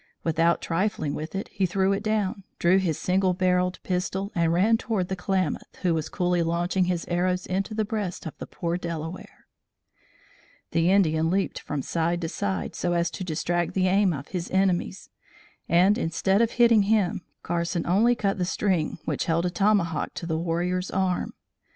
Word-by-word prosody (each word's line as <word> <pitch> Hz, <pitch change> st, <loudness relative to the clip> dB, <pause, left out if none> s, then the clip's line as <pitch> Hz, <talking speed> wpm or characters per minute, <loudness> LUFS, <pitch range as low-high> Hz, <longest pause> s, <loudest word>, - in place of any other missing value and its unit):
Without 165 Hz, +1 st, +2 dB
trifling 165 Hz, -4 st, -1 dB
with 155 Hz, +5 st, -5 dB
it, 195 Hz, -, -3 dB
he 190 Hz, -1 st, 0 dB
threw 190 Hz, +2 st, +1 dB
it 195 Hz, -, -2 dB
down, 210 Hz, -2 st, -1 dB
drew 180 Hz, +3 st, +4 dB
his 170 Hz, -5 st, -1 dB
single 185 Hz, 0 st, +1 dB
barrelled 180 Hz, 0 st, +1 dB
pistol 190 Hz, +2 st, -2 dB
and 170 Hz, -3 st, +2 dB
ran 195 Hz, +7 st, +4 dB
toward 215 Hz, -5 st, -2 dB
the 190 Hz, -, -1 dB
Klamath, 185 Hz, 0 st, -2 dB
who 175 Hz, -2 st, +3 dB
was 160 Hz, -1 st, -2 dB
coolly 180 Hz, -2 st, 0 dB
launching 175 Hz, +3 st, +1 dB
his 175 Hz, -2 st, -1 dB
arrows 180 Hz, +1 st, 0 dB
into 195 Hz, +3 st, -2 dB
the 215 Hz, 0 st, 0 dB
breast 205 Hz, -4 st, -4 dB
of 160 Hz, -, -6 dB
the -, -, -6 dB
poor 170 Hz, 0 st, -3 dB
Delaware. 170 Hz, 0 st, -6 dB, 1.3 s
The 165 Hz, +1 st, +2 dB
Indian 165 Hz, -5 st, +3 dB
leaped 195 Hz, +2 st, 0 dB
from 145 Hz, -2 st, -4 dB
side 170 Hz, +1 st, 0 dB
to 165 Hz, -, -2 dB
side, 90 Hz, -, -3 dB
so 175 Hz, -, -1 dB
as 170 Hz, 0 st, +1 dB
to -, -, -5 dB
distract 175 Hz, +1 st, -1 dB
the 185 Hz, -1 st, +2 dB
aim 195 Hz, 0 st, +3 dB
of 140 Hz, -3 st, -6 dB
his 180 Hz, -2 st, -4 dB
enemies, 190 Hz, 0 st, 0 dB, 0.6 s
and, 190 Hz, +6 st, +4 dB
instead 190 Hz, +4 st, +1 dB
of 230 Hz, -, +1 dB
hitting 235 Hz, -2 st, +5 dB
him, 205 Hz, -5 st, +2 dB, 0.2 s
Carson 170 Hz, 0 st, -1 dB
only 220 Hz, +7 st, +3 dB
cut 200 Hz, -3 st, -1 dB
the -, -, +1 dB
string 185 Hz, -3 st, 0 dB
which -, -, -1 dB
held 170 Hz, +1 st, +1 dB
a 180 Hz, -, 0 dB
tomahawk 195 Hz, -4 st, +1 dB
to -, -, -5 dB
the 160 Hz, -1 st, -1 dB
warrior's 180 Hz, +2 st, -1 dB
arm. 190 Hz, -1 st, -1 dB
180 Hz, 180 wpm, -26 LUFS, 170-195 Hz, 1.3 s, hitting